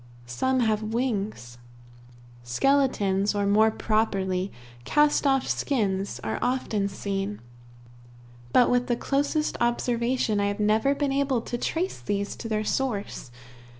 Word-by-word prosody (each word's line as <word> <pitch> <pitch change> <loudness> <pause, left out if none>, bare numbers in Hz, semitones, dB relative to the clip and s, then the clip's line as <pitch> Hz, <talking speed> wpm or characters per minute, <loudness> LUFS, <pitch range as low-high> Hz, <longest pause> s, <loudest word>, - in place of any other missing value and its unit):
Some 255 - 0
have 220 -2 +1
wings. 215 - -3 0.8
Skeletons, 205 - +1
or 205 0 +1
more 215 +2 +4
properly, 195 -4 0 0.3
cast 295 - +3
off 270 -1 +2
skins, 200 -7 -1
are 110 -1 -2
often 225 -5 0
seen, 195 +1 -3 1.1
but 245 - +5
with 245 0 +2
the 240 - +1
closest 285 +4 0
observation 240 -1 +1
I 200 - +1
have 205 +1 -3
never 215 +6 +2
been 285 -1 0
able 275 -3 +1
to 240 - -5
trace 335 +9 -2
these 200 0 -2
to 225 - -6
their 215 -1 0
source. 210 - -2
220 Hz, 125 wpm, -26 LUFS, 200-260 Hz, 1.1 s, but